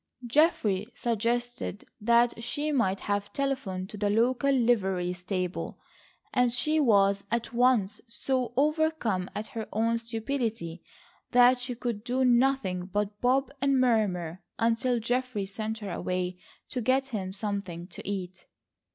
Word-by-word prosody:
Geoffrey 230 - +2
suggested 240 0 -2 0.2
that 235 +1 +3
she 290 +6 -2
might 200 -9 +1
have 205 0 -2
telephoned 260 -10 -2
to 210 - -9
the 205 0 0
local 245 +6 +2
livery 195 -9 +2
stable, 180 0 -4 0.5
and 250 -1 +3
she 305 +6 +1
was 200 -6 +4
at 235 0 -2
once 240 -5 +2
so 250 +2 -1
overcome 300 - +1
at 210 - -3
her 225 -1 -6
own 230 +2 +1
stupidity 225 -7 -3 0.5
that 245 0 +6
she 250 0 -3
could 230 -3 -3
do 255 +2 +1
nothing 240 -8 +2
but 205 +1 -2
bob 260 +2 +2
and 275 -1 +3
murmur, 190 -9 +1 0.2
until 230 +2 +1
Geoffrey 245 -2 -1
sent 215 +3 -4
her 205 -3 -6
away 180 0 -2 0.3
to 250 - -3
get 265 +3 +2
him 195 -6 -3
something 195 -4 -4
to 180 - -9
eat. 190 -2 -5
230 Hz, 135 wpm, -28 LUFS, 195-250 Hz, 0.5 s, that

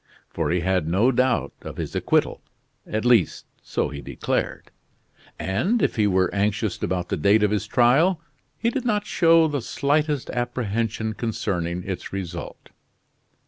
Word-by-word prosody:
For - - -1
he 90 0 +1
had 90 -2 0
no 100 +10 +3
doubt 130 0 +1
of - - -8
his - - -4
acquittal; - - +1 0.5
at 110 +2 -2
least, 120 -9 +3 0.2
so - - -2
he 70 -2 -7
declared; - - -3 0.7
and 130 - 0
if - - +1
he 105 -3 +2
were 95 -1 +2
anxious 105 +1 -1
about 90 -1 -2
the - - -1
date 100 +7 +4
of 105 - +2
his 105 0 -1
trial, 140 - +4 0.4
he 235 - 0
did 260 0 -2
not 210 -4 0
show 165 -4 +4
the 145 -3 -2
slightest 145 +3 0
apprehension 115 -2 -2
concerning 90 -6 -2
its 95 -1 -5
result. 90 -3 -6
110 Hz, 150 wpm, -24 LUFS, 95-135 Hz, 0.7 s, date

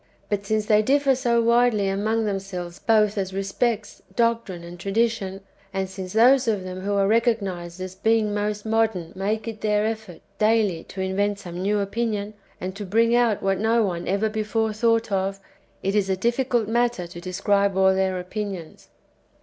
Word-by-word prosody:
^ - - -37 0.3
But 200 -1 -2
since 215 0 +1
they 210 0 +4
differ 275 +4 +3
so 240 -3 +1
widely 235 -3 +3
among 215 +3 0
themselves 190 -4 -4
both 215 -2 +3
as 190 -1 -3
respects 210 +3 -2
doctrine 230 -7 0
and 175 +1 -10
tradition, 195 -1 -1 0.3
and 190 -1 -2
since 185 -1 -7
those 250 +3 +5
of 210 -4 0
them 185 0 -6
who 200 +2 -2
are 195 -1 +3
recognised 200 -6 0
as 185 0 -5
being 215 +2 +1
most 210 0 -2
modern 220 -6 0
make 210 +3 -2
it 225 -1 -6
their 210 0 +1
effort 220 -5 -5 0.2
daily 215 -6 +2
to 190 - -7
invent 200 +2 0
some 180 -3 -7
new 205 +2 +1
opinion, 210 0 -2 0.3
and 185 +1 -5
to 210 - -5
bring 230 +4 +2
out 240 -4 +2
what 195 -1 +1
no 225 +2 +3
one 175 -4 -2
ever 200 +3 +1
before 220 0 -1
thought 230 0 +1
of, 195 0 -1 0.4
it 195 - 0
is 205 -2 +1
a 190 - +1
difficult 240 +1 +1
matter 235 -4 +1
to 170 0 -10
describe 200 +2 +1
all 190 0 +5
their 190 -1 0
opinions. 185 -3 -6
205 Hz, 180 wpm, -24 LUFS, 190-225 Hz, 0.4 s, those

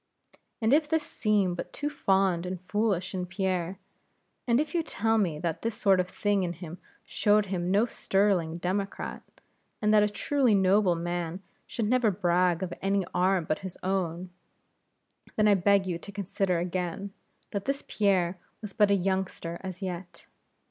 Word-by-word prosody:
And 220 +4 +4
if 300 0 +3
this 320 -1 +1
seem 205 -8 +1
but 175 - -6
too 295 - -3
fond 190 - +1
and 185 0 -4
foolish 200 -1 -1
in 180 -1 -3
Pierre; 185 -1 -2 0.7
and 235 +1 +4
if 305 +3 -2
you 340 - +2
tell 225 -7 0
me 170 -7 0
that 165 +1 -3
this 230 -1 -2
sort 200 -5 +3
of 180 0 0
thing 205 +1 0
in 175 -2 -1
him 175 0 -9 0.3
showed 210 -1 +2
him 180 -2 -2
no 205 +4 +4
sterling 195 -7 +1
Democrat, 195 +3 -3 0.6
and 210 0 +2
that 210 - +6
a 210 - +3
truly 255 +1 +2
noble 190 -1 +4
man 175 +1 -3 0.2
should 225 - -2
never 245 -1 +3
brag 180 -2 +1
of 180 -2 -4
any 195 -1 +1
arm 185 -1 +2
but 155 - -1
his 190 -2 -7
own; 180 -1 -2 1.0
then 215 -1 +3
I 205 - +6
beg 195 +1 +3
you 175 -2 -3
to 200 - -10
consider 195 -2 -1
again 180 +2 -3 0.4
that 200 -1 -3
this 275 +1 -1
Pierre 185 -4 +1 0.2
was 210 -3 -8
but 210 -2 +4
a 200 - +5
youngster 190 -3 -2
as 190 0 -6
yet. 180 -1 -6
190 Hz, 170 wpm, -28 LUFS, 180-210 Hz, 1.0 s, that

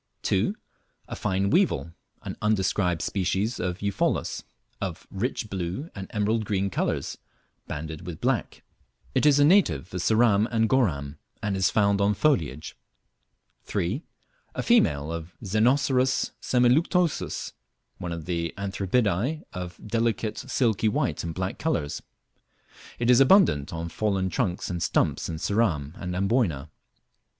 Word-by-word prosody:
2. - - +1 0.5
A - - -4
fine 95 +1 0
weevil, 170 - +2 0.3
(an - - -5
undescribed 95 -4 +1
species 100 +4 -1
of 90 +2 -3
Eupholus,) 100 -1 0 0.4
of 95 -3 -4
rich 110 +3 -2
blue 95 - -4
and 95 -2 -7
emerald 110 +1 0
green 100 -1 -1
colours, - - -2 0.5
banded 80 +3 -6
with 85 -3 -6
black. - - -1 0.5
It - - +3
is 145 -1 +6
a 145 - +6
native 105 - +3
of 90 - -2
Ceram 110 0 +4
and 115 -1 +2
Goram, 75 - 0 0.2
and 105 -2 0
is 95 -1 +2
found 100 -1 +2
on 100 +1 +3
foliage. 80 - 0 0.9
3. 100 - -1 0.5
A - - -2
female 80 - +3
of 85 +1 -7
Xenocerus 125 +5 +2
semiluctuosus, 150 +7 +1 0.5
one 90 - -4
of 85 -2 -5
the 85 -1 -2
Anthribidae 100 - 0
of 90 -2 -6
delicate 115 -1 -1
silky 115 -4 +1
white - - -1
and 80 -1 -4
black 95 0 -3
colours. 85 - -1 1.0
It 120 +1 +3
is 125 - +6
abundant 135 - +5
on 85 0 -4
fallen 95 0 -1
trunks 95 -7 -1
and 85 -1 -3
stumps - - +1
in 80 - -3
Ceram 85 -6 0
and 90 -1 -5
Amboyna. 95 - 0
100 Hz, 135 wpm, -26 LUFS, 85-120 Hz, 1.0 s, is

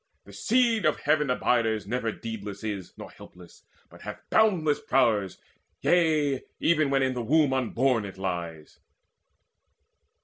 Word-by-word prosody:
The - - -15
seed 235 -3 +1
Of 155 - +1
Heaven 150 -1 +1
abiders 115 -3 +1
never 115 +1 -2
deedless 105 -3 -7
is 100 -4 -5
Nor - - -10
helpless, 90 -1 -16 0.2
but - - -17
hath - - -9
boundless 175 -9 +3
prowess, 110 -7 +1 0.4
yea, 155 -6 +2 0.2
Even 155 -3 +2
when 135 -1 +2
in 130 -1 0
the 125 - -3
womb 145 +3 +2
unborn 130 -2 +1
it 100 -2 -8
lies. 85 -5 -5
125 Hz, 135 wpm, -26 LUFS, 105-150 Hz, 0.4 s, boundless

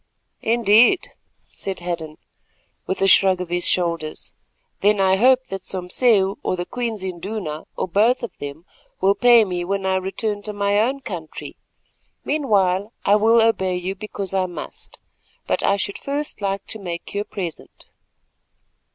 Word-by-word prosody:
"Indeed," 230 - +4 0.4
said 195 -1 -5
Hadden, 165 -3 -5 0.7
with 190 - -1
a - - +4
shrug 190 -1 +5
of 180 -2 -5
his 175 0 +2
shoulders; 170 -3 -1 0.5
"then 210 +1 +3
I 190 -1 +4
hope 255 +5 +4
that 195 -1 -5
Sompseu, 195 +2 +2
or - - -1
the 175 0 -4
Queen's 230 -4 -3
Induna, 185 -3 -5
or - - -1
both 220 +8 +2
of 235 - -6
them, 145 +4 -7 0.3
will 195 +1 +4
pay 240 +1 +6
me 180 -2 -3
when 195 +2 -2
I 190 0 +2
return 205 +2 -3
to 210 +1 -5
my 200 0 +1
own 260 +5 0
country. 175 -10 -7 0.7
Meanwhile 205 -8 +1
I 200 - +5
will 225 +2 +4
obey 190 -5 +1
you 180 +2 -3
because 195 -1 -5
I 190 -1 +1
must, 175 - -7 0.5
but - - 0
I 200 - +2
should 200 0 -3
first 285 -2 -2
like 195 0 -2
to 220 - -4
make 175 -3 -6
you 200 - -1
a - - -2
present." 190 -5 -7
195 Hz, 160 wpm, -21 LUFS, 180-220 Hz, 0.7 s, pay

